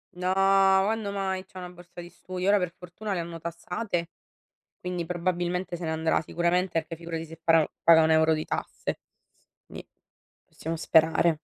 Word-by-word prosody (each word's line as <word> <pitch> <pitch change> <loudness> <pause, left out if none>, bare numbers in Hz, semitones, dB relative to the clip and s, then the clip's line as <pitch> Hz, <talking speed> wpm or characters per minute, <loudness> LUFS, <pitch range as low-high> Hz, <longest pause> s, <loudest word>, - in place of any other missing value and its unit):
No, 180 +1 -1
quando 195 +2 +3
mai, 190 -1 -2
c'ha 185 - -16
una 180 -1 -7
borsa 175 0 -14
di 175 0 -8
studio. 185 +1 -5
Ora 205 0 +5
per 180 -2 -2
fortuna 180 +4 -6
le 185 - -1
hanno 170 0 -6
tassate, 170 +2 -4 0.7
quindi 180 -1 -3
probabilmente 175 +1 -2
se 175 -1 -5
ne 160 - -1
andrà, 160 0 +1
sicuramente, 175 +2 0
e 165 - +1
poi 165 - -7
figurati 165 -1 -5
se 165 0 -12
pa 165 -2 +4 0.2
paga 160 -1 +7
1 160 - +3
euro 160 0 +4
di 155 0 -2
tasse. - - -4 0.7
Ni - - -10 0.6
possiamo 165 +1 -5
sperare. 160 0 +3
175 Hz, 170 wpm, -27 LUFS, 165-185 Hz, 0.7 s, paga